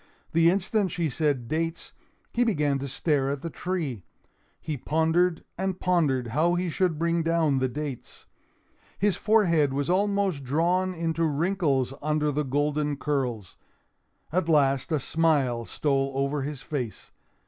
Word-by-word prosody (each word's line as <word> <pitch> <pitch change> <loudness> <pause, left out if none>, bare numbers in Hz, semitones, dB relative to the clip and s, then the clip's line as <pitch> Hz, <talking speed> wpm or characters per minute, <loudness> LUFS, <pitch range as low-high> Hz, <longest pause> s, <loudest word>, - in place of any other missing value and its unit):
The 165 +1 +5
instant 195 +1 +1
she 165 -4 -1
said 140 -5 0
dates, 165 +3 -3 0.4
he 245 - +3
began 150 - +1
to 140 - -4
stare 135 0 0
at 140 -1 -3
the 165 - -4
tree. 155 - -3 0.6
He 155 - -4
pondered 160 +5 +1 0.2
and 190 -1 -2
pondered 145 -9 +1
how 160 +8 +2
he 175 -1 -1
should 180 -2 0
bring 170 +1 +1
down 165 -4 +2
the 130 - +1
dates. 140 -1 -6 0.7
His 205 0 +2
forehead 170 -10 +3
was 145 +4 0
almost 200 -5 +1
drawn 175 +7 +1
into 165 0 0
wrinkles 150 -4 0
under 150 0 +1
the 150 +1 0
golden 145 +1 0
curls. 130 -9 -2 0.7
At 170 0 0
last 140 -2 +2
a 155 - +2
smile 140 -6 +1
stole 135 0 0
over 140 +1 0
his 140 -1 -5
face. 125 -7 -5
155 Hz, 145 wpm, -26 LUFS, 140-170 Hz, 0.7 s, The